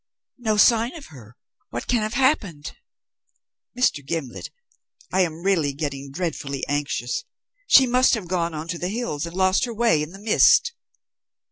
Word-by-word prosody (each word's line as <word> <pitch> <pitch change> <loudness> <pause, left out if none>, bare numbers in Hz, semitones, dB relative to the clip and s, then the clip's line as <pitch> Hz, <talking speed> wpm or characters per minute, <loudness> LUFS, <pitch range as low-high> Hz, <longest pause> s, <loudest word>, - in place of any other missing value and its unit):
"No 220 -3 0
sign 230 +5 +4
of 310 -4 -10
her. 120 -3 -14 0.3
What 120 - -5
can 240 -2 +1
have 215 +2 -3
happened? 200 - 0 1.0
Mr. 200 - +1
Gimblet, 140 -4 -5 0.6
I 190 - +3
am 170 -1 -2
really 165 -8 +1
getting 140 -1 -5
dreadfully 140 -4 -4
anxious. 145 - -2 0.4
She 265 - +7
must 255 +1 +3
have 205 -6 -6
gone 170 -2 -1
on 155 +2 -6
to 170 -1 -3
the 180 - -2
hills 195 -9 -3
and 170 - -10
lost 190 +4 +2
her 235 - -6
way 225 -9 +2
in 150 - -4
the 190 - -12
mist." 225 - +4
180 Hz, 160 wpm, -23 LUFS, 145-230 Hz, 1.0 s, She